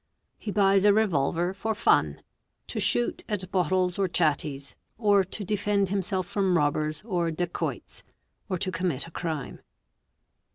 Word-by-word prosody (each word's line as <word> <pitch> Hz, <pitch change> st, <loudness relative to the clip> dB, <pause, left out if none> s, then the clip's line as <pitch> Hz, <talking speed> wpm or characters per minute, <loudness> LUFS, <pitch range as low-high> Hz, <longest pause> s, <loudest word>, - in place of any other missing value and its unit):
He -, -, -6 dB
buys 195 Hz, -1 st, +3 dB
a 205 Hz, -1 st, +6 dB
revolver 175 Hz, -3 st, +1 dB
for 220 Hz, +3 st, -2 dB
fun—to 210 Hz, -, -1 dB
shoot 240 Hz, -, +1 dB
at 190 Hz, -3 st, -3 dB
bottles 185 Hz, 0 st, +1 dB
or 195 Hz, -, +2 dB
chatties, 150 Hz, -4 st, -1 dB, 0.2 s
or 205 Hz, -3 st, +4 dB
to 190 Hz, +3 st, -5 dB
defend 205 Hz, -1 st, 0 dB
himself 190 Hz, -1 st, 0 dB
from 190 Hz, -1 st, +1 dB
robbers 150 Hz, +2 st, 0 dB
or 175 Hz, -6 st, -1 dB
dacoits, 175 Hz, +2 st, -4 dB, 0.5 s
or 185 Hz, -, 0 dB
to 185 Hz, +2 st, -2 dB
commit 175 Hz, -8 st, -1 dB
acrime. 160 Hz, -4 st, -5 dB
185 Hz, 130 wpm, -27 LUFS, 165-200 Hz, 0.5 s, a